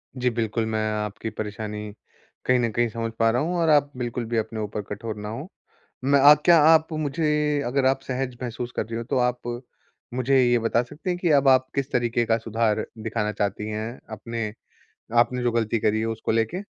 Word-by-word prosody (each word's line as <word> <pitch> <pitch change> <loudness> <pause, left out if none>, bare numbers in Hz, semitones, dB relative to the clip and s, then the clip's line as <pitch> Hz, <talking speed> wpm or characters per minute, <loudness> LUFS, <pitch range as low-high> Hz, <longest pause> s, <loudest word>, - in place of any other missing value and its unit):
जी, 125 -1 +1
बिल्कुल 115 -1 -1
मैं 110 - 0
आपकी 105 +1 -4
परेशानी 105 0 -5 0.5
कहीं 125 0 +3
न 120 -1 +1
कहीं 120 +2 +1
समझ 115 +1 -4
पा 115 0 +4
रहा 120 +2 +1
हूँ 175 +4 -1
और 165 -1 +2
आप 145 -1 +4
बिल्कुल 120 -1 -3
भी 115 - +2
अपने 110 0 -2
ऊपर 105 0 -3
कठोर 105 +2 -5
ना 105 0 -5
हो। 135 +9 -6 0.6
मैं 140 +1 +4
आ 145 +2 +9
क्या 175 -1 +7
आप 160 0 +6
मुझे 150 -1 0
अगर 130 +2 0
आप 135 0 +2
सहज 130 -1 -3
महसूस 120 0 -4
कर - - -1
रही 115 +1 -5
हो 115 - -3
तो - - +1
आप 125 0 -3 0.7
मुझे 130 +2 +2
ये 120 -1 +3
बता 115 +1 +1
सकते 150 +9 -7
हैं 180 - 0
कि 175 -2 +1
अब 140 -1 +4
आप 130 -1 +5
किस 140 0 -1
तरीके 120 -1 +1
का 115 0 +2
सुधार 110 -1 0 0.2
दिखाना 105 -1 -1
चाहती 105 +1 -2
हैं, 110 +3 -5
अपने 110 0 -4 0.7
आपने 125 +1 +2
जो 120 - +2
गलती 115 -1 0
करी 110 +1 +1
है 110 - -1
उसको 115 0 -2
लेके? 115 - 0
120 Hz, 210 wpm, -24 LUFS, 110-135 Hz, 0.7 s, आ